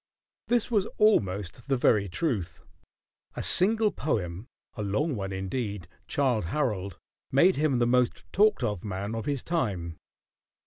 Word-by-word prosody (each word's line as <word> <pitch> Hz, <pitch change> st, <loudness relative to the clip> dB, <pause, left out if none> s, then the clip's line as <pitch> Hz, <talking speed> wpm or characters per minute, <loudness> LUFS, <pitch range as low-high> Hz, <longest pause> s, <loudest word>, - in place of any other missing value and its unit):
This 240 Hz, -1 st, +1 dB
was 210 Hz, -2 st, +2 dB
almost 100 Hz, -, +1 dB
the 135 Hz, -1 st, +1 dB
very 105 Hz, -5 st, +3 dB
truth. 90 Hz, -, -3 dB, 0.7 s
A -, -, -4 dB
single 215 Hz, +3 st, +4 dB
poem, 100 Hz, -, -3 dB, 0.3 s
a 105 Hz, -, -6 dB
long 130 Hz, +9 st, 0 dB
one 95 Hz, -2 st, -4 dB
indeed, 95 Hz, 0 st, -4 dB, 0.2 s
"Childe 125 Hz, -9 st, +1 dB
Harold," 100 Hz, -, -2 dB, 0.3 s
made 175 Hz, +8 st, +5 dB
him 145 Hz, -3 st, +2 dB
the 120 Hz, -, +2 dB
most 125 Hz, 0 st, +1 dB
talked 210 Hz, -6 st, +3 dB
of 105 Hz, -6 st, -2 dB
man 100 Hz, +1 st, -4 dB
of 115 Hz, -1 st, -4 dB
his 140 Hz, -3 st, -1 dB
time. 95 Hz, -, -2 dB
115 Hz, 140 wpm, -27 LUFS, 95-150 Hz, 0.7 s, made